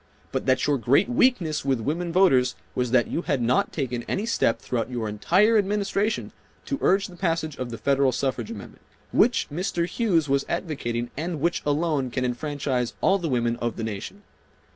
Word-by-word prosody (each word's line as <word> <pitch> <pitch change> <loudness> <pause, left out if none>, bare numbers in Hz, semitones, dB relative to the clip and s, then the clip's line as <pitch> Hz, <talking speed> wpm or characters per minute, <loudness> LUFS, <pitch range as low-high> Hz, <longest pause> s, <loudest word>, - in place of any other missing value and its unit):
But - - -3
that 130 0 +3
your 145 -2 +1
great 135 - +3
weakness 240 -11 +2
with 135 -3 +1
women 165 +8 -2
voters 135 -9 +4 0.2
was 125 -1 -1
that 125 0 +3
you - - -2
had 145 -5 -1
not 120 +1 +1
taken 125 -5 -2
any 200 - -1
step 170 - +1
throughout 120 -1 -3
your 120 -3 -3
entire 190 - +3
Administration 205 +1 -1 0.3
to 280 - -3
urge 195 +1 +3
the 180 - -10
passage 165 -4 -1
of 125 -1 -4
the 115 - -6
Federal 140 0 +2
Suffrage 135 - -2
Amendment, 230 - -9 0.3
which 245 - +3
Mr. 175 0 -1
Hughes 180 -9 +1
was 140 0 +2
advocating 120 -9 -3
and 165 +2 -3
which 170 +4 0
alone 145 -3 +1
can 125 +1 -2
enfranchise 130 -1 -2
all 195 +1 +3
the 170 -3 -2
women 120 -2 0
of 120 -1 -2
the 115 - -5
nation. 110 - -6
145 Hz, 185 wpm, -25 LUFS, 125-180 Hz, 0.3 s, voters